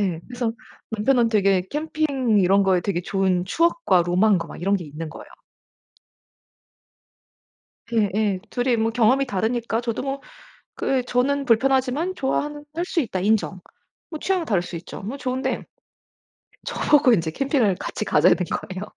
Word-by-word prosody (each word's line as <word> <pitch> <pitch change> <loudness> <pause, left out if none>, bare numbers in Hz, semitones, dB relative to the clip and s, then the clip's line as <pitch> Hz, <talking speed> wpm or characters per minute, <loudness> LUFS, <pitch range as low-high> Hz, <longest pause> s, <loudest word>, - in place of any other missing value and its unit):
예. 180 -5 -1
그래서 245 -2 -2 0.4
남편은 230 +2 +2
되게 195 -4 +3
캠핑 285 -7 0
이런 195 +2 +4
거에 190 -2 +3
되게 175 -1 -2
좋은 185 -1 0
추억과 330 - +2
로망과 180 0 +2
막 - - -10
이런 195 +3 +1
게 180 - -6
있는 155 +2 -7
거예요. 155 - -11 2.7
예 220 -3 +2
예. 205 -3 +1
2이 245 -1 0
뭐 225 0 +1
경험이 245 +4 +3
다르니까 230 +1 -1
저도 230 -2 -3
뭐 275 0 -3 0.6
그 265 -2 +1
저는 265 +3 0
'불편하지만 265 +7 +2
좋아하는 295 0 -2
할 340 - -1
수 360 -1 0
있다.' 225 -9 -3
인정. 200 -1 0 0.5
뭐 315 -2 -6
취향은 375 -3 0
다를 190 - +1
수 175 - -7
있죠. 165 - -8
뭐 225 +8 -5
좋은데 260 -1 -2 1.0
저 - - -5 0.2
보고 290 -4 +6
인제 165 -6 +1
캠핑을 245 - +1
같이 - - -4
가자는 - - +4
거예요. 185 +1 -4
225 Hz, 300 characters per minute, -23 LUFS, 190-270 Hz, 2.7 s, 보고